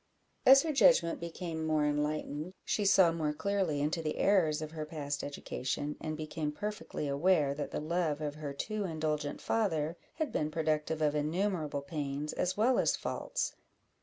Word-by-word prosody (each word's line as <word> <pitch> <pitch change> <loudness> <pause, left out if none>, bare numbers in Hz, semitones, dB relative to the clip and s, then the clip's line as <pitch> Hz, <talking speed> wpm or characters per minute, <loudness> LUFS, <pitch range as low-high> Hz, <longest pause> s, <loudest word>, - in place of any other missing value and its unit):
As 270 +1 +9
her 320 -2 -1
judgment 245 -11 +5
became 170 -1 -4
more 155 -1 +2
enlightened, 150 +3 -2
she 205 - 0
saw 190 -3 +6
more 155 -2 -1
clearly 185 -4 0
into 155 +3 0
the 155 -1 -2
errors 170 -7 +3
of 155 -1 -5
her 160 -1 -4
past 145 -2 -4
education, 145 0 -3
and 155 -1 -3
became 155 -1 -3
perfectly 210 -3 -4
aware 145 0 +3
that 145 +1 -4
the - - -3
love 155 -1 0
of 150 -2 -3
her 150 -1 -5
too 215 +9 -3
indulgent 155 -4 -2
father 170 -7 0 0.2
had 315 -2 -2
been 150 - 0
productive 155 0 0
of 150 -1 +3
innumerable 155 -1 -1
pains, 145 0 -3
as 180 +2 -1
well 245 +4 +4
as - - +3
faults. - - -3
155 Hz, 165 wpm, -32 LUFS, 150-180 Hz, 0.2 s, As